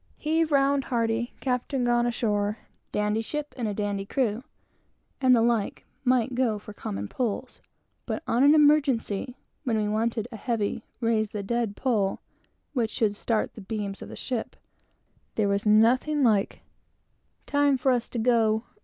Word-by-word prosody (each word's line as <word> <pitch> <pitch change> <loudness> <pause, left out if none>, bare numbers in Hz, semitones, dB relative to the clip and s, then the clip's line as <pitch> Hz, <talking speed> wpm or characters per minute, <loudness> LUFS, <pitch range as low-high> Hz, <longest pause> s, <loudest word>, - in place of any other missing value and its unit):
"Heave 320 +1 +1
round 275 -1 +3
hearty!" 230 -1 -1
"Captain 255 0 -1
gone 240 0 +2
ashore!" 210 -3 0 0.3
and 210 0 0
the 220 -3 -2 1.0
like, 230 -3 0 0.2
might 255 -1 +2
do 240 -4 +1
for 210 0 -10
common 100 - -5
pulls, 235 - -3 0.5
but - - -3
in 240 +3 +3
an 290 +2 +7
emergency, 275 -6 +2 0.3
when 235 -5 0
we 210 -1 0
wanted 220 +1 -1
a 225 - -7
heavy, 225 -2 -2 0.2
"raise 225 -2 +1
the 205 -1 -5
dead" 230 0 -1
pull, 215 -7 0 0.5
which 235 -5 0
should 215 -2 0
start 220 +1 -1
the 215 - -10
beams 200 -1 -4
of - - -8
the - - -8
ship, 245 -4 -4 0.8
there 215 -2 +2
was 200 +1 0
nothing 250 +8 +4
like 210 -5 +2 0.8
"Time 285 -1 +3
for 260 +1 +2
us 245 -2 0
to - - -5
go!" 225 -2 +2
230 Hz, 140 wpm, -26 LUFS, 210-255 Hz, 1.0 s, an